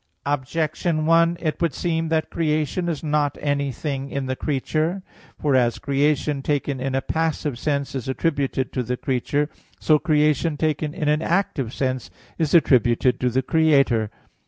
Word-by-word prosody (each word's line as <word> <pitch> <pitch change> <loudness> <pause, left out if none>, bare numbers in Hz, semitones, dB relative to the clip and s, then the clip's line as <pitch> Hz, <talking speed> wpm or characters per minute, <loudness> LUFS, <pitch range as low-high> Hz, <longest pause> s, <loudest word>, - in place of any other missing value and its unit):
Objection 155 +3 -1
1: 165 +1 +4
It 155 +1 -2
would 170 - +1
seem 165 -2 -1
that 160 -1 0
creation 155 +2 0
is 160 -2 -3
not 150 -2 0
anything 140 -1 -2
in 140 -1 -3
the 130 0 -2
creature. 155 +7 -1 0.4
For 145 -3 +1
as 120 -2 +2
creation 145 0 0
taken 140 -1 -1
in 130 +1 -2
a 135 - 0
passive 160 -5 -1
sense 140 -2 -1
is 130 -3 -4
attributed 135 -2 -1
to 130 - 0
the 125 +1 -3
creature, 140 +4 0 0.3
so 155 -1 +4
creation 150 0 +2
taken 155 0 -1
in 150 - -2
an 150 +1 +2
active 165 - 0
sense 130 -2 -2 0.3
is 160 0 +2
attributed 125 -5 +4
to 125 - +1
the 130 +2 0
Creator. 140 -8 +3
145 Hz, 155 wpm, -23 LUFS, 135-160 Hz, 0.4 s, 1